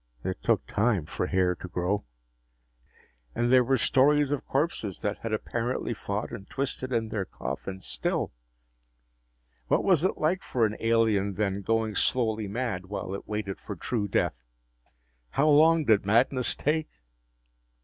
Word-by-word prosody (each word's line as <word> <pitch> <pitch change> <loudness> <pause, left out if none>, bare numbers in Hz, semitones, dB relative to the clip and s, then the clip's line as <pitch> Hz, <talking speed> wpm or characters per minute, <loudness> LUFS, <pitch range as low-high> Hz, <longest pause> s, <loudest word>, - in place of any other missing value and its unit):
It - - -3
took - - +1
time 105 -6 +1
for 90 - -3
hair 90 -1 +2
to 90 - -9
grow. 90 +3 -1 1.3
And 120 +2 +2
there 130 -1 +7
were 135 +2 +2
stories 145 +4 +3
of 145 - -2
corpses 135 - -1
that 105 0 -2
had 115 - -4
apparently 120 +2 -2
fought 105 0 -4
and 110 -4 -8
twisted 130 -1 -3
in 115 -2 0
their 100 -4 -2
coffins 95 +7 -6
still. - - -1 1.4
What - - +2
was 180 -5 +3
it 185 - +1
like 175 +5 +1
for 120 -3 +1
an 105 0 -1
alien 110 -4 +2
then, 100 -1 -1
going 110 +1 0
slowly 110 -2 0
mad 105 -4 -3
while 95 -1 -4
it 100 - -6
waited 105 -2 -3
for - - -7
true 110 -4 -2
death? 60 -9 0 0.9
How 145 - +3
long 155 +1 +5
did 110 -4 +4
madness 120 +5 +2
take? 155 +1 0
110 Hz, 150 wpm, -28 LUFS, 100-130 Hz, 1.4 s, there